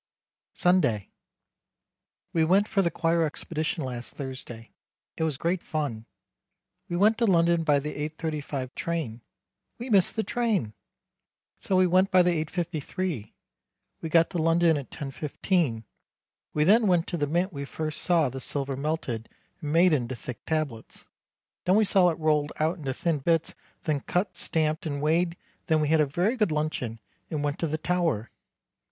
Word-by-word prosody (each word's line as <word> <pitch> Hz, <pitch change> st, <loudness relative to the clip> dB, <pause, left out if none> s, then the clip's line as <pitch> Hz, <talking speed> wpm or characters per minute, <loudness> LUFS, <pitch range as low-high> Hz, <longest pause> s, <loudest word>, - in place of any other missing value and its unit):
Sunday. 175 Hz, -, +2 dB, 1.2 s
We 165 Hz, -, +3 dB
went 195 Hz, +6 st, +4 dB
for 200 Hz, -, +2 dB
the 170 Hz, -, +2 dB
choir 165 Hz, 0 st, +1 dB
expedition 155 Hz, 0 st, -2 dB
last 125 Hz, -2 st, -6 dB
Thursday. 130 Hz, -4 st, -7 dB, 0.4 s
It -, -, -6 dB
was 155 Hz, -4 st, -1 dB
great 170 Hz, +4 st, 0 dB
fun. 135 Hz, -8 st, -3 dB, 0.8 s
We 175 Hz, -, -2 dB
went 215 Hz, +5 st, +4 dB
to 235 Hz, -, +3 dB
London 170 Hz, -2 st, +3 dB
by 150 Hz, -2 st, +4 dB
the 150 Hz, +2 st, -3 dB, 0.2 s
8.35 150 Hz, -5 st, -4 dB
train. 160 Hz, -10 st, -3 dB, 0.6 s
We 240 Hz, +1 st, -6 dB
missed 195 Hz, -4 st, +4 dB
the 220 Hz, -, 0 dB
train!! 215 Hz, -, 0 dB, 0.9 s
So 190 Hz, -, -1 dB
we 185 Hz, 0 st, +5 dB
went 185 Hz, +2 st, +3 dB
by 185 Hz, -3 st, +5 dB
the 180 Hz, -, +3 dB
8.53. 165 Hz, -, -4 dB, 0.7 s
We 165 Hz, -, -4 dB
got 165 Hz, +1 st, +4 dB
to 175 Hz, -, -2 dB
London 165 Hz, 0 st, +4 dB
at 140 Hz, -5 st, -5 dB
10.15. 145 Hz, -, -1 dB, 0.7 s
We 150 Hz, -, +3 dB
then 215 Hz, +6 st, +5 dB
went 175 Hz, -3 st, +3 dB
to 175 Hz, -, -3 dB
the 145 Hz, -2 st, 0 dB
mint 175 Hz, +5 st, 0 dB
we 140 Hz, -1 st, -4 dB
first 155 Hz, +2 st, -3 dB
saw 170 Hz, -4 st, +3 dB
the 130 Hz, +1 st, -5 dB
silver 135 Hz, +1 st, -2 dB
melted 135 Hz, -6 st, -3 dB, 0.3 s
and 150 Hz, -2 st, -3 dB
made 170 Hz, +2 st, +5 dB
into 130 Hz, -3 st, 0 dB
thick 125 Hz, 0 st, -8 dB
tablets, 155 Hz, -8 st, -3 dB, 0.6 s
then 185 Hz, -, +4 dB
we 215 Hz, 0 st, +5 dB
saw 190 Hz, -2 st, +5 dB
it 165 Hz, -, -2 dB
rolled 150 Hz, -2 st, +1 dB
out 160 Hz, +4 st, +1 dB
into 135 Hz, -4 st, -3 dB
thin 165 Hz, -4 st, 0 dB
bits 165 Hz, +3 st, +1 dB, 0.3 s
then 150 Hz, -3 st, 0 dB
cut 180 Hz, +8 st, -1 dB
stamped 155 Hz, +1 st, 0 dB
and 145 Hz, -2 st, -3 dB
weighed 170 Hz, +3 st, +1 dB, 0.3 s
then 160 Hz, -2 st, +3 dB
we 150 Hz, -1 st, +1 dB
had 160 Hz, 0 st, +4 dB
a 150 Hz, -, +2 dB
very 180 Hz, -, +1 dB
good 215 Hz, -8 st, +1 dB
luncheon 150 Hz, -7 st, -2 dB, 0.3 s
and 150 Hz, -2 st, -2 dB
went 145 Hz, -1 st, -2 dB
to 165 Hz, -, 0 dB
the 155 Hz, +1 st, -2 dB
Tower. 165 Hz, -10 st, 0 dB
160 Hz, 165 wpm, -27 LUFS, 145-175 Hz, 1.2 s, we